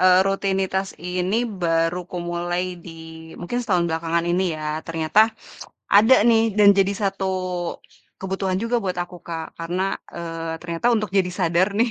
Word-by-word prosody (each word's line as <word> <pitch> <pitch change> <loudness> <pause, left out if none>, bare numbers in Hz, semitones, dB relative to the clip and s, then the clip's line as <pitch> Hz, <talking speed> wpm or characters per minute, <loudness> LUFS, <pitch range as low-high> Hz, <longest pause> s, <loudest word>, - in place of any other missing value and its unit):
e - - +3 0.2
rutinitas 195 -1 0 0.2
ini 180 +3 -1 0.3
baru 165 +1 +1
kumulai 175 0 -2 0.2
di 170 - -8 0.5
mungkin 210 +8 -3
setahun 185 -7 +1
belakangan 165 +1 -1
ini 180 +2 +2
ya, 155 - -6 0.2
ternyata 165 +5 +2 0.7
ada 220 +6 +7
nih 225 -1 +5 0.2
dan 205 -1 +7
jadi 195 0 +3
satu 195 0 -1 1.0
kebutuhan 190 0 -1
juga 230 +1 0
buat 185 - -1
aku 180 0 -10
Kak, 165 -1 -4
karena 175 +2 -2 0.3
e - - -6 0.4
ternyata 170 +5 -3
untuk 215 -3 -1
jadi 180 -1 +1
sadar 175 +1 +2
nih, 235 +1 +3
180 Hz, 145 wpm, -22 LUFS, 170-195 Hz, 1.0 s, ada